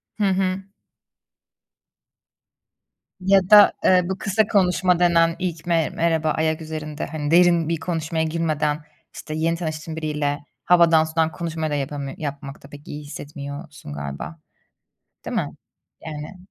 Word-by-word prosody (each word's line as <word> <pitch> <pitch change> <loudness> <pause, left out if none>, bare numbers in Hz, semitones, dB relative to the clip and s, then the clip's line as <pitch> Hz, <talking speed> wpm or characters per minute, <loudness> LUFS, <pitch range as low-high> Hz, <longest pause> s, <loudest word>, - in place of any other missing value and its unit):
Hı 210 - -2
hı. 190 0 0 2.6
Ya 195 +1 +5
da, 210 -1 +9
eee, 185 -1 +5
bu 190 - -2
kısa 205 +2 +1
konuşma 180 -3 +2
denen; 165 -1 +4
ilk 175 -3 -3
me 165 -2 +2
merhaba 160 -2 +1
ayak 160 +1 0
üzerinde, 155 -1 -5
hani 150 -1 -4
derin 170 -2 +5
bir 165 -1 -1
konuşmaya 160 -1 -2
girmeden 155 -2 -1 0.3
işte, 155 - -7
yeni 165 +2 0
tanıştığın 160 -1 -5
biriyle, 150 -2 -2 0.3
havadan 170 -2 +5
sudan 160 0 0
konuşmayı 160 -2 -3
da - - 0
yapamıyor 140 -1 -4
yapmakta 140 -2 -7
pek 145 0 -13
iyi 150 0 -7
hissetmiyorsun 145 - -8
galiba, 70 +2 -6 0.9
değil - - -4
mi? - - 0 0.6
Yani 155 +3 -7
160 Hz, 130 wpm, -23 LUFS, 150-170 Hz, 2.6 s, da